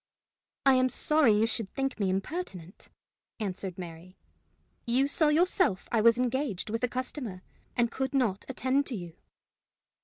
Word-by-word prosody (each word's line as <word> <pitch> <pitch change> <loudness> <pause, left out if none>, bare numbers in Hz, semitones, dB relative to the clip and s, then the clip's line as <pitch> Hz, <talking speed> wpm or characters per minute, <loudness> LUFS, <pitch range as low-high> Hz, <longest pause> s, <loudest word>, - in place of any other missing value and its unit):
"I 270 - +7
am 255 0 +3
sorry 300 -4 +3
you 220 - +4
should 225 -3 -3
think 270 -3 -2
me 195 -2 +1
impertinent," 190 - -4 0.5
answered 190 -3 -4
Mary. 175 +1 -9 0.7
"You 255 +4 +3
saw 305 +2 +2
yourself 330 - +2
I 230 - +3
was 230 +1 +6
engaged 250 -5 -1
with 230 +2 -2
a - - +4
customer, 250 -6 -5 0.3
and 235 -1 +2
could 265 +1 -2
not 220 -7 +1
attend 265 +2 0
to 250 - -3
you." 175 -4 -7
235 Hz, 150 wpm, -29 LUFS, 195-270 Hz, 0.7 s, I